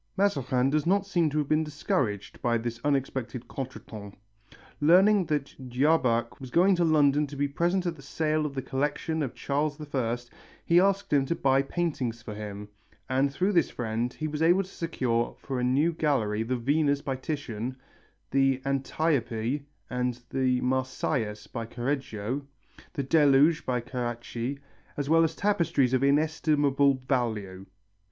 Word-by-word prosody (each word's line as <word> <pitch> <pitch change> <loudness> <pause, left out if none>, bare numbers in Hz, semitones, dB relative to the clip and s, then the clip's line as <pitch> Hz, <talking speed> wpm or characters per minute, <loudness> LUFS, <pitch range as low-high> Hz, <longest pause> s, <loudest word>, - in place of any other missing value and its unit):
Mazarin 135 -9 +1
does 155 +2 +1
not 200 +2 +3
seem 175 -5 +1
to 150 - -3
have 150 -2 0
been 155 +1 +2
discouraged 135 -8 -2
by 120 -1 +2
this 115 0 -5
unexpected 130 -4 -2
contretemps. 110 -6 -8 0.6
Learning 185 +6 +5
that 145 -2 -2 0.2
Jabach 125 -3 +2
was 130 -2 -8
going 185 +7 +4
to 175 - +2
London 150 -2 +3
to 140 - -9
be 145 +1 0
present 175 +6 0
at 170 -1 -1
the 145 - -14
sale 155 +2 -1
of 140 - -9
the 135 - -3
collection 150 +3 -1
of 135 -5 -3
Charles 145 +2 -1
I, 120 -3 0 0.5
he 170 +1 +5
asked 195 -1 +1
him 135 -2 +3
to 170 - 0
buy 135 -2 +3
paintings 135 -7 -2
for 110 - -6
him, 105 -1 -7 0.4
and 135 +2 +1
through 185 +8 0
this 170 -6 +3
friend 115 +1 -3
was 150 +1 -3
able 175 +4 +4
to - - -13
secure 125 -8 -1
for 130 -2 -4
a - - -1
new 140 +7 +2
gallery 125 -10 0
the 125 +3 -1
Venus 145 +3 +1
by 135 - -2
Titian, 130 -4 -4 0.6
the 135 -1 +3
Antiope 135 -2 0 0.3
and 125 -1 -1
the 130 -2 +1
Marsyas 130 -4 -1
by 115 -2 -6
Correggio, 125 -1 -3 0.5
the 145 -5 -2
Deluge 145 +1 +4
by 125 -2 0
Carracci, 120 +1 -4 0.4
as 145 +1 -2
well 165 0 +6
as 160 0 0
tapestries 170 -10 +1
of 130 +1 +2
inestimable 145 -1 +3
value. 110 -8 -2
135 Hz, 155 wpm, -28 LUFS, 125-155 Hz, 0.6 s, well